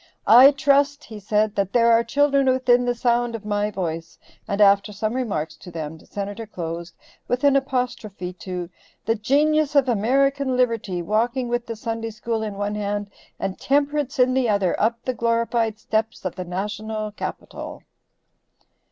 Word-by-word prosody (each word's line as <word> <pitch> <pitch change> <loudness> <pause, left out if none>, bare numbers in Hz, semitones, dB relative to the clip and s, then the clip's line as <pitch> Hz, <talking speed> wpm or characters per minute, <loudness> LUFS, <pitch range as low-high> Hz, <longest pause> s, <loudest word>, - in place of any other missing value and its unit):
"I 250 +4 +9
trust," 285 +1 +2
he 215 -2 -9
said, 210 +1 +1
"that 195 -2 -1
there 235 -1 +5
are 230 0 +5
children 275 +2 +2
within 255 -1 +3
the 245 0 0
sound 240 0 +1
of 215 -2 -8
my 205 0 0
voice," 165 -4 -5 0.3
and 200 - -2
after 200 0 +5
some 215 +2 -2
remarks 195 -12 -2
to 180 - -12
them, 160 -2 -6
the - - -20
Senator 205 +2 -5
closed 170 -2 -6 0.3
with 245 +2 -1
an 285 -1 +5
apostrophe 235 -9 -2
to 180 -1 -6 0.4
"the 225 - +2
genius 295 +6 +2
of 275 -2 +5
American 260 +4 +1
Liberty, 225 -8 0
walking 235 +6 0
with 240 0 -2
the 230 - -4
Sunday 225 0 -4
School 225 +1 -3
in 210 -2 -4
one 205 +1 -2
hand 205 -1 -3 0.3
and 195 -1 -3
Temperance 285 0 0
in 255 0 +4
the 255 -3 +1
other 200 -4 +2
up 230 +2 +2
the 255 - 0
glorified 230 -1 0
steps 220 -1 -2
of 185 - -2
the 185 - -6
National 210 +4 -4
Capitol." 210 - -7
225 Hz, 170 wpm, -23 LUFS, 200-250 Hz, 0.4 s, I